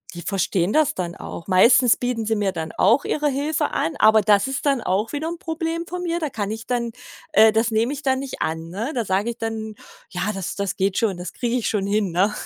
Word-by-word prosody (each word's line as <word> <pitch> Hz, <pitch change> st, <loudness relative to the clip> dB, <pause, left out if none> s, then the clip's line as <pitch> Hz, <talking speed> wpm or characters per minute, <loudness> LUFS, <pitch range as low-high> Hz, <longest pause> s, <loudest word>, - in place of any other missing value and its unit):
die 170 Hz, -, -6 dB
verstehen 190 Hz, -1 st, 0 dB
das 310 Hz, -3 st, +3 dB
dann 175 Hz, -2 st, -4 dB
auch. 170 Hz, -, -8 dB
Meistens 235 Hz, +6 st, +5 dB
bieten 245 Hz, -3 st, -2 dB
sie 220 Hz, -, +1 dB
mir 205 Hz, -2 st, 0 dB
dann 160 Hz, -3 st, -5 dB
auch 230 Hz, +8 st, +3 dB
ihre 300 Hz, -1 st, 0 dB
Hilfe 295 Hz, +2 st, -1 dB
an, 165 Hz, -, -1 dB
aber 220 Hz, 0 st, +6 dB
das 205 Hz, -1 st, +4 dB
ist 270 Hz, 0 st, -3 dB
dann 275 Hz, -2 st, +3 dB
auch 200 Hz, +5 st, -1 dB
wieder 295 Hz, +2 st, -3 dB
'n 340 Hz, 0 st, -5 dB
Problem 330 Hz, 0 st, -3 dB
von 360 Hz, 0 st, -5 dB
mir, 340 Hz, -1 st, -1 dB
da 310 Hz, -3 st, -2 dB
kann 205 Hz, -5 st, -3 dB
ich 225 Hz, +1 st, -6 dB
dann 240 Hz, -2 st, -1 dB, 0.4 s
äh, 220 Hz, +2 st, +6 dB
das 225 Hz, +1 st, +1 dB
nehme 230 Hz, +5 st, +1 dB
ich 290 Hz, -, -7 dB
dann 265 Hz, -1 st, +1 dB
nicht 270 Hz, -1 st, -6 dB
an, 160 Hz, +1 st, -3 dB
ne? 215 Hz, -, -4 dB
Da 235 Hz, -3 st, -1 dB
sage 200 Hz, +5 st, 0 dB
ich 235 Hz, -, -12 dB
dann: 220 Hz, -1 st, -4 dB, 0.4 s
„Ja, 190 Hz, +3 st, -2 dB
das 195 Hz, -3 st, -5 dB
das 200 Hz, -1 st, -2 dB
geht 190 Hz, 0 st, 0 dB
schon. 205 Hz, -5 st, 0 dB
Das 180 Hz, +1 st, -7 dB
kriege 240 Hz, -1 st, -2 dB
ich 240 Hz, -, -2 dB
schon 200 Hz, -2 st, -1 dB
hin“, 205 Hz, -2 st, 0 dB
ne? 190 Hz, +5 st, +2 dB
220 Hz, 245 wpm, -22 LUFS, 195-265 Hz, 0.4 s, aber